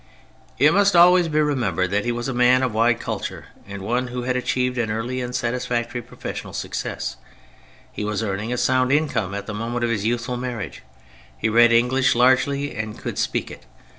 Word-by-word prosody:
It 150 +3 +5
must 200 0 +3
always 175 0 +6
be 155 -1 0
remembered 100 - 0
that 100 +2 0
he 120 - +1
was 120 +1 -3
a 135 - -2
man 125 +1 +4
of 125 -4 -1
wide 115 +1 +2
culture - - -5 0.2
and 100 -1 -7
one 125 +5 -1
who 125 0 -5
had 125 +1 -1
achieved 125 0 -1
an 115 -2 0
early 120 +4 -2
and 125 0 -4
satisfactory 120 0 -2
professional - - -7
success; - - -4 0.7
he - - -5
was 105 +1 -2
earning 105 +2 -3
a 125 - -1
sound 130 +1 +2
income 120 -10 0
at 100 0 -5
the 110 - -6
moment 115 +3 -3
of 120 - +1
his 105 -3 -1
youthful 120 +2 -1
marriage; 120 -5 -5 0.6
he 110 - 0
read 120 +1 +5
English 125 +3 +3
largely 130 +3 +2
and 110 0 -5
could - - -5
speak - - -1
it. 65 - -12
120 Hz, 195 wpm, -22 LUFS, 110-130 Hz, 0.7 s, always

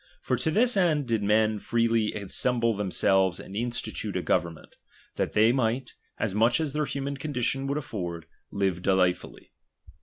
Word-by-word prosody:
For - - -1
to - - -1
this 235 +8 +2
end 165 -7 +2
did 115 -2 0
men 110 +1 +2
freely 115 -1 +1
assemble 115 +3 0
themselves 95 -2 +2
and 95 - -10
institute 120 +2 -3
a - - -3
government, 85 -1 -2 0.4
that - - -2
they 110 +2 +5
might, 125 0 -1 0.2
as 105 -4 -1
much 115 +4 +3
as 155 -4 -2
their 150 0 0
human 140 0 -4
condition 135 -1 -2
would 140 +1 -1
afford, 90 - -5 0.2
live 95 -3 -1
delightfully. 90 -1 0
115 Hz, 155 wpm, -27 LUFS, 100-135 Hz, 0.4 s, they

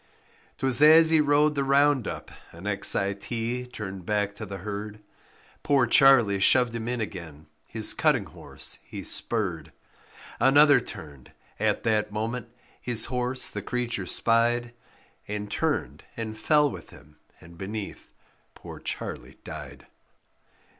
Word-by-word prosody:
'Twas 130 +1 +4
as 160 +2 +8
he 160 -1 +5
rode 150 +1 +3
the 140 -1 -1
round 140 -2 +2
up, - - -7 0.2
an 85 +3 -12
X 100 -1 +1
I 100 0 0
T 120 +4 -4
turned 95 -6 -8
back 105 +1 -1
to 110 +1 -8
the 100 0 -7
herd; 105 +2 -7 0.6
Poor 140 -3 +2
Charlie 120 -6 +5
shoved 125 +4 +3
him 115 -1 -5
in 125 0 -2
again, 85 -8 -7 0.2
his - - +3
cutting - - +1
horse - - -5
he - - -9
spurred; 95 -10 -3 0.7
Another 145 +3 +6
turned; 70 -5 -9 0.3
at - - 0
that 105 -2 0
moment 115 +3 -4 0.3
his 120 -3 +1
horse 125 +1 0
the 105 - -4
creature 120 -4 -3
spied 120 +2 +1 0.5
And 105 0 -5
turned - - -2
and 110 -1 -5
fell 150 +5 +2
with - - -10
him, 75 +2 -18 0.2
and 85 +1 -15
beneath, 100 +3 -7 0.5
poor - - -11
Charlie 65 +2 -7
died. - - -10
115 Hz, 140 wpm, -26 LUFS, 100-130 Hz, 0.7 s, as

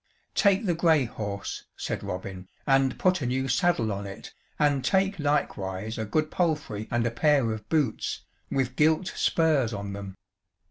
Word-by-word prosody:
"Take 200 +1 +3
the 175 - +2
grey 160 -4 +3
horse," 100 -3 -5
said - - -3
Robin, 95 0 -6 0.2
"and 135 -2 +3
put 185 -3 +2
a 125 - -1
new 130 +2 0
saddle 135 - +2
on 100 0 -4
it, 100 - -9 0.2
and 145 -3 +2
take 195 +4 +2
likewise 110 -8 -1
a 110 - -1
good 155 +8 0
palfrey 150 - -1
and 120 0 +1
a 120 - +1
pair 135 -1 +3
of 110 -1 -6
boots, 155 -4 0 0.3
with 130 -2 -1
gilt 155 +5 +3
spurs 150 -8 +2
on 100 -1 -5
them. 100 -1 -7
130 Hz, 165 wpm, -27 LUFS, 105-155 Hz, 0.3 s, Take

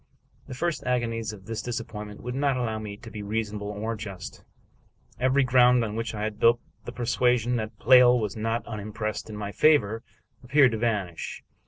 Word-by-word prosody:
The 130 - -7
first 170 +4 -2
agonies 115 -3 -1
of 100 -3 -12
this 115 0 -4
disappointment 110 -3 -6
would 125 +1 -4
not 140 0 +1
allow 110 -3 -2
me 105 -2 -7
to 115 0 -11
be 105 - -6
reasonable 105 0 -3
or 105 +2 -3
just. 100 -4 -8 0.8
Every 130 +2 +3
ground 125 -1 +5
on 105 -1 -5
which 115 -1 -3
I 105 - -3
had 110 -1 -3
built 120 +1 +5 0.3
the - - -5
persuasion 125 0 +1
that 110 -1 -5
Pleyel 125 0 +6
was 105 -3 -3
not 115 +1 -2
unimpressed 105 0 -4
in 110 - -6
my 100 -1 -4
favor 115 -6 +3 0.4
appeared 135 +1 +5
to 110 - -3
vanish. 105 -7 -2
115 Hz, 180 wpm, -26 LUFS, 105-125 Hz, 0.8 s, Pleyel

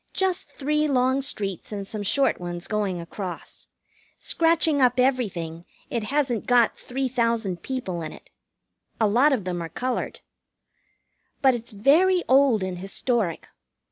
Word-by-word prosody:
Just 380 -1 0
three 300 +2 0
long 260 0 +2
streets 200 - -4
and 200 -2 -5
some 215 0 -5
short 270 +7 +1
ones 175 0 -5
going 205 -4 -1
across. 175 +1 -7 0.5
Scratching 325 -3 +2
up 250 0 +3
everything, 190 -11 0 0.3
it 230 -3 -1
hasn't 260 -3 0
got 245 -2 +4
three 265 +1 -3
thousand 230 -7 0
people 215 -10 -4
in 155 - -5
it. - - -15 0.7
A 220 - +4
lot 250 +8 +4
of 250 -7 0
them 180 -1 -3
are 165 - -5
colored. 250 +9 -3 1.2
But 265 -1 +6
it's 235 0 -5
very 340 - +4
old 260 -6 +4
and 185 -1 -4
historic. 195 -1 -1
235 Hz, 140 wpm, -25 LUFS, 195-270 Hz, 1.2 s, But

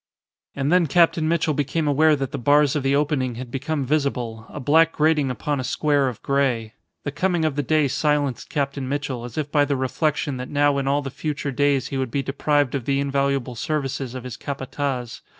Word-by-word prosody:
And 140 +1 0
then 180 -2 +4
Captain 165 0 +3
Mitchell 165 -2 +1
became 145 +2 -1
aware 155 +2 +4
that 135 -2 -3
the 140 - -4
bars 145 +2 +4
of 150 - +1
the 135 +1 +2
opening 140 -4 0
had 125 0 -7
become 140 +1 -2
visible, 125 -6 -1
a - - -7
black 160 +4 +4
grating 150 -3 +2
upon 140 +3 -2
a - - -2
square 145 +1 +1
of 120 -4 -6
grey. 125 -5 0 0.3
The 145 - -3
coming 175 +1 0
of 155 -3 0
the 145 - +1
day 155 +1 +2
silenced 145 -1 0
Captain 140 -2 -2
Mitchell 135 -4 -3
as 120 - -9
if 150 -2 -2
by 145 -2 +4
the 145 0 0
reflection 140 +1 -1
that 125 0 -6
now 145 -1 +2
in 135 - -2
all 145 +1 +1
the 135 - -5
future 145 0 -3
days 140 0 +1
he 135 - -2
would 130 -2 -1
be 135 +4 -1
deprived 145 -1 +1
of 135 -5 -2
the 140 0 +1
invaluable 140 -2 0
services 135 -1 -3
of 130 - -6
his 125 -2 -7
Capataz. 135 -3 -4
140 Hz, 210 wpm, -23 LUFS, 130-150 Hz, 0.3 s, then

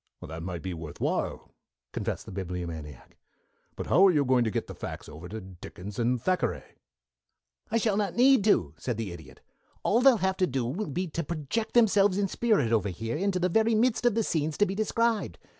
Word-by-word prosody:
"That 80 +1 -7
might 85 0 -5
be 95 -1 -3
worth 80 -3 -8
while," - - -2 0.4
confessed - - -3
the - - -9
Bibliomaniac. 85 -6 -6 0.6
"But - - -5
how 195 +2 +6
are - - +5
you 145 -4 +2
going 125 -1 +3
to - - +1
get - - -2
the - - -8
facts - - -7
over 80 +4 -10
to 110 - -5
Dickens 95 +2 -9
and 120 +1 +1
Thackeray?" 115 - 0 1.1
"I 230 - +1
shall 215 -3 +1
not 205 -4 -1
need 260 -2 +5
to," 85 - +3
said 120 -4 -3
the 110 -5 -4
Idiot. 80 -6 -12 0.4
"All 230 +4 +3
they'll 265 -2 +6
have 190 0 0
to 185 - +2
do 130 -2 -1
will 160 - -3
be 180 +6 -2
to 170 +2 -3
project 170 - -3
themselves 205 -4 +4
in 200 -1 +1
spirit 205 - +1
over 105 -3 +2
here 115 +6 -4
into 195 +3 0
the 180 0 +1
very 220 +5 +2
midst 235 +2 +2
of 235 - +2
the 225 - +2
scenes 155 -4 -1
to 205 - +4
be 190 - -3
described. 220 +2 0
155 Hz, 210 wpm, -28 LUFS, -, 1.1 s, how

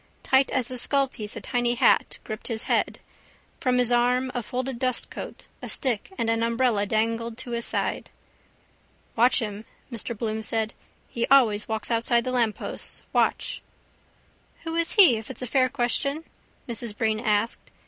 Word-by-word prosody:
Tight 265 0 +3
as 255 -1 0
a 255 - -1
skullpiece 260 -6 0
a - - -6
tiny 240 -1 0
hat - - +3
gripped 215 -1 -6
his 225 -2 -1
head. - - 0 0.6
From 255 -1 +1
his 245 -1 +2
arm 250 +2 +2
a 245 - -2
folded 255 +2 -4
dustcoat, 255 -1 -2 0.2
a - - -6
stick 255 - -1
and 230 - -1
an 225 0 +1
umbrella 230 -3 +1
dangled 230 +2 -1
to 245 - -5
his 235 -1 0
stride. - - -2 1.1
—Watch 240 +3 +4
him, 210 -1 -4 0.3
Mr 235 0 -3
Bloom 220 0 -2
said. 220 0 -1 0.3
He 235 - -2
always 225 -7 +4
walks 220 +1 -3
outside 235 +1 +2
the 255 - -2
lampposts. 235 -4 -2
Watch! - - +1 1.0
—Who 325 -1 -4
is 335 0 +1
he 360 - +7
if 220 +3 -8
it's 265 - -6
a - - -2
fair 255 +2 +2
question? 275 +3 -1 0.4
Mrs 230 -3 -5
Breen 220 -1 +1
asked. 215 -1 0
235 Hz, 160 wpm, -25 LUFS, 225-255 Hz, 1.1 s, he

